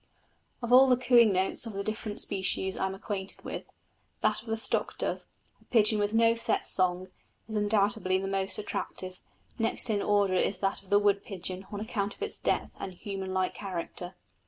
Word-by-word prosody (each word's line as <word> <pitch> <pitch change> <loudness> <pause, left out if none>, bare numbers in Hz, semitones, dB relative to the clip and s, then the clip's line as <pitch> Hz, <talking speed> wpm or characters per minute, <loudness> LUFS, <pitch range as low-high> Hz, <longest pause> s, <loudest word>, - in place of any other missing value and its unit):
Of 235 +1 +1
all 265 +1 +9
the 250 -1 +4
cooing 240 -3 +5
notes 190 +5 0
of 225 - -6
the 200 0 -3
different 215 0 -3
species 190 -1 0
I 190 - 0
am 190 - -5
acquainted 195 -1 -5
with, - - -5 0.6
that - - +2
of 235 - -19
the 225 0 -1
stock 220 - 0
dove, - - -2 0.3
a - - -24
pigeon 215 -2 +4
with 205 0 +1
no 230 +1 +4
set 230 - 0
song, 185 0 +1 0.4
is 220 - -6
undoubtedly 205 -2 +2
the 195 +1 -3
most 195 0 -1
attractive: 185 -3 -5 0.4
next 225 0 +1
in 205 -1 +1
order 205 -2 +2
is 185 +1 +1
that 195 +1 -1
of 195 - -20
the 205 - +5
wood 205 -1 +2
pigeon 190 -3 -5
on 205 - -4
account 205 -2 -2
of - - -6
its 430 - -1
depth - - 0
and 190 - -5
human 195 0 -5
like 185 -1 0
character. 180 -1 -5
200 Hz, 195 wpm, -29 LUFS, 190-220 Hz, 0.6 s, all